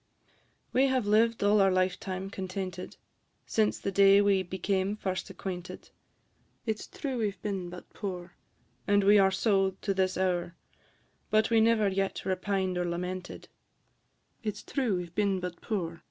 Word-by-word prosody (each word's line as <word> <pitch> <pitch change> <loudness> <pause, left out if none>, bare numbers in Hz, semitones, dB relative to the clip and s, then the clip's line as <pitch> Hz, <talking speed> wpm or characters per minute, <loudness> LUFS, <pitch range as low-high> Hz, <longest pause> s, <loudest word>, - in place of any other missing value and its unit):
We 265 +2 +4
have 260 -4 +1
lived 225 +2 +3
all 205 0 +5
our 195 - +5
lifetime 185 +1 -1
contented, 185 -1 -5 0.5
Since 215 -2 +1
the 195 - -3
day 195 +1 +6
we 200 -2 +3
became 190 +2 -1
first 185 -3 -3
acquainted: 180 -2 -7 0.7
It 220 -2 -1
's - - -9
true 265 -4 -4
we 215 -2 +1
've 195 -2 -13
been 195 -4 -3
but 180 0 -10
poor, 180 -3 -6 0.5
And 205 0 +4
we 205 +1 +6
are 195 -1 +5
so 195 -1 +1
to 200 - +1
this 190 -1 0
hour, 175 -2 0 0.7
But 215 +1 +2
we 225 -1 +5
never 220 -2 +4
yet 195 0 -1
repined 190 -1 -1
or 175 - 0
lamented; 180 +2 -5 0.9
It 210 -2 -3
's - - -10
true 245 -9 0
we 180 - -3
've 170 - -17
been 200 -1 +1
but 180 -1 -6
poor, 170 -6 -3
&c. - - -24
195 Hz, 170 wpm, -29 LUFS, 185-210 Hz, 0.9 s, day